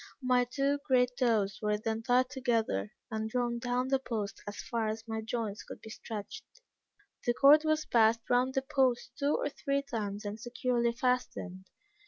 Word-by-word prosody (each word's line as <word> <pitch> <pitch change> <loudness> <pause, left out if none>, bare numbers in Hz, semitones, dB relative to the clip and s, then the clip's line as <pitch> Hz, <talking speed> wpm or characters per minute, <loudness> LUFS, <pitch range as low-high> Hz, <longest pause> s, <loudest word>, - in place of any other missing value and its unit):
My 250 -1 +3
two 275 +3 0
great 250 -2 +4
toes 215 -6 +2
were 210 -1 +1
then 220 +1 -2
tied 250 +2 +2
together, 225 - 0 0.2
and 220 0 -2
drawn 240 0 -1
down 245 +2 -1
the 270 0 +3
post 220 -5 -4
as 205 -1 -6
far 230 -3 -2
as 220 +1 -4
my 220 0 -3
joints 220 -2 -3
could - - -10
be 220 - -11
stretched; 215 -2 -7 0.8
the 240 - +1
cord 285 +3 +7
was 310 0 +1
passed 225 0 +3
round 250 +1 +2
the 265 - +1
post 265 -3 +1
two 285 +1 +2
or - - -1
three 280 0 -1
times 210 -5 -4
and 205 +2 -4
securely 240 0 0
fastened. 235 -7 -2
240 Hz, 175 wpm, -31 LUFS, 220-255 Hz, 0.8 s, cord